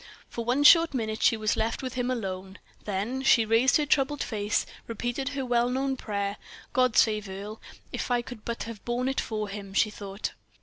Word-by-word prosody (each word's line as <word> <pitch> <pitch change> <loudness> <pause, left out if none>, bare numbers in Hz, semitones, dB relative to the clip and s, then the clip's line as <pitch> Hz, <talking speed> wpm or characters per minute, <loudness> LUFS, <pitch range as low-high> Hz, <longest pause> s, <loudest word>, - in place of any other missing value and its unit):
For 235 - -4
one 250 +5 +1
short 330 0 +7
minute 220 -3 -2
she 225 - +4
was 215 -1 +1
left 225 +4 -1
with 255 - -4
him 250 -1 -1
alone, 190 -5 -4 0.3
then 210 +6 -2
she 240 -4 +5
raised 230 +5 +4
her 300 - 0
troubled 285 0 +1
face, 210 -2 -1 0.2
repeated 240 +4 -2
her 275 -2 -3
well 240 0 +2
known 265 +1 0
prayer: 200 -4 -3 0.4
"God 255 -3 +3
save 215 -2 +3
Earle! 205 +3 -7 0.3
If - - -3
I 245 -1 +1
could 235 -3 -10
but 235 0 -3
have 225 -2 -8
borne 245 +2 -1
it 270 - 0
for 215 -2 -3
him!" 200 -1 -8
she 215 - +3
thought. 200 0 -5
230 Hz, 200 wpm, -27 LUFS, 210-255 Hz, 0.4 s, short